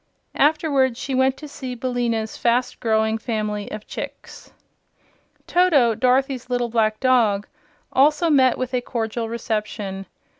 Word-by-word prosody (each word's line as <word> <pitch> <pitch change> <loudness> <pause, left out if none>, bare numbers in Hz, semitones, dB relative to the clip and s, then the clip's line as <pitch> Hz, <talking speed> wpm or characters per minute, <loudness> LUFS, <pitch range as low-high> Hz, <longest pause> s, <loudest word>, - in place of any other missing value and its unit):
Afterward, 280 -4 +2
she 270 - -4
went 260 +1 +2
to 300 - -9
see 260 -3 -7
Billina's 235 -3 -2
fast 245 +1 0
growing 220 -1 +1
family 215 -2 -3
of 215 0 -7
chicks. - - -8 0.9
Toto, 310 -10 +3
Dorothy's 255 +2 +1
little 245 -1 0
black 215 -2 +1
dog, 230 -6 +2 0.5
also 300 +5 +4
met 260 -3 +4
with 255 0 -4
a 250 - +1
cordial 230 -1 -3
reception. 210 -4 -4
245 Hz, 125 wpm, -22 LUFS, 220-260 Hz, 0.9 s, also